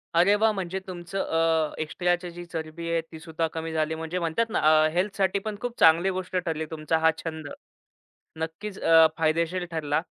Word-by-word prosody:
अरे 180 +4 +5
वाह! 220 +1 +3
म्हणजे 190 -1 -3
तुमचं, 175 +1 -6
अ, 165 -3 +1
एक्स्ट्राची 175 +3 -1
जी 175 +1 -8
चरबी 165 0 -6
आहे 165 0 +1
तीसुद्धा 160 0 -3
कमी 165 0 -4
झाली. 155 0 0
म्हणजे 160 +3 -4
म्हणतात 170 +7 0
ना, - - 0 0.3
अ, - - +4
हेल्थसाठी 195 +1 0
पण 215 +1 -5
खूप 245 -1 -4
चांगली 165 +4 +6
गोष्ट 185 0 -4
ठरली 165 -3 -1
तुमचा 160 0 0
हा 160 0 +4
छंद. 160 -2 -5 0.9
नक्कीच 165 +6 -5
अ, 165 -1 +6
फायदेशीर 165 +3 0
ठरला. 155 -2 0
165 Hz, 170 wpm, -26 LUFS, 160-185 Hz, 0.9 s, चांगली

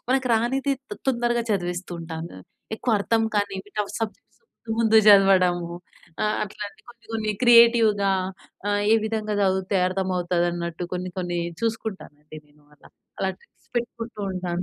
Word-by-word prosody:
మనకు 260 -1 +2
రానిది 265 +5 +1 0.2
తొ - - -3
తొందరగా 240 -1 +1
చదివిస్తూ 180 -2 -2
ఉంటాను. 165 - -7 0.4
ఎక్కువ 245 - -2
అర్థం 225 +3 +1
కాని 205 -1 0 0.2
టఫ్ 205 -1 -1
సబ్జెక్ట్స్ 220 -2 -6
ముందు 225 - -7
ముందు 225 -1 +4
చదవడము. 185 -4 +5 0.5
ఆహ్ 210 - +1
,అట్లాంటి 210 0 -8
కొన్ని 235 -1 -16
కొన్ని 215 -1 -1
క్రియేటివ్‌గా 230 -4 +6 0.6
ఆహ్, 205 0 +1
ఏ - - +7
విధంగా 215 -1 -2
చదివితే 190 0 +1
అర్థమవుతది 180 -2 0
అన్నట్టు 170 0 -4
కొన్ని 180 0 -4
కొన్ని 175 -1 -2 0.2
చూసుకుంటానండి 190 -9 -5
నేను 150 0 -26
అలా - - -19 0.3
అలా 190 - +1
ట్రిప్స్ - - -30
పెట్టుకుంటూ 235 -2 -4
ఉంటాను. 180 -1 -3
200 Hz, 140 wpm, -24 LUFS, 180-225 Hz, 0.6 s, ఏ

